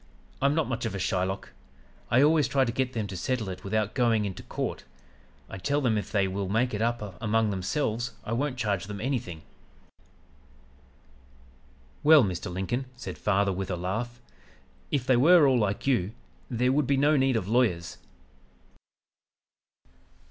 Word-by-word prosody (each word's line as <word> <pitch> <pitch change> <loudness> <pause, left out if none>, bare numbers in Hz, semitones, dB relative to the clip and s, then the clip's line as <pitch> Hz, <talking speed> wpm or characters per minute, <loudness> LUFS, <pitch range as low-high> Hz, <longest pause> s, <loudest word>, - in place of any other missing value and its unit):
I'm 140 +2 +3
not 160 -2 +1
much 120 -2 -2
of 100 - -5
a - - -2
Shylock. 95 +1 -2 0.6
I 130 +4 +5
always 150 -2 +4
try 135 +1 +2
to 120 - -1
get 130 +1 -1
them 110 -3 -2
to 100 -1 -7
settle 110 +3 -2
it 90 - -7
without 105 +1 -1
going 115 -4 +2
into 95 -2 -5
court. - - -4 0.6
I 95 - -8
tell 140 +8 0
them 125 -6 +1
if 105 -3 -3
they 100 -2 +2
will 95 0 -3
make 115 +4 +1
it 105 - -2
up 115 -5 -2
among 110 -1 +1
themselves 110 +4 -2
I 110 - -4
won't 130 +2 -1
charge 100 -6 -1
them 105 -1 -6
anything.' 110 - -3 2.6
"'Well, 150 -2 +8
Mr. 90 -3 -3
Lincoln,' 95 +9 -2
said 125 - -8
father 100 -1 +1
with 95 0 -4
a 90 - -1
laugh, 115 +8 -4 0.7
'if 135 -4 -1
they 130 -2 +4
were 160 +3 +6
all 130 -2 +3
like 100 -2 -1
you 110 -7 +1 0.4
there 125 +1 +1
would 140 -1 +1
be 140 - +2
no 145 +3 +4
need 135 -2 +2
of 100 -5 -1
lawyers.' 110 -8 0
115 Hz, 165 wpm, -27 LUFS, 100-130 Hz, 2.6 s, Well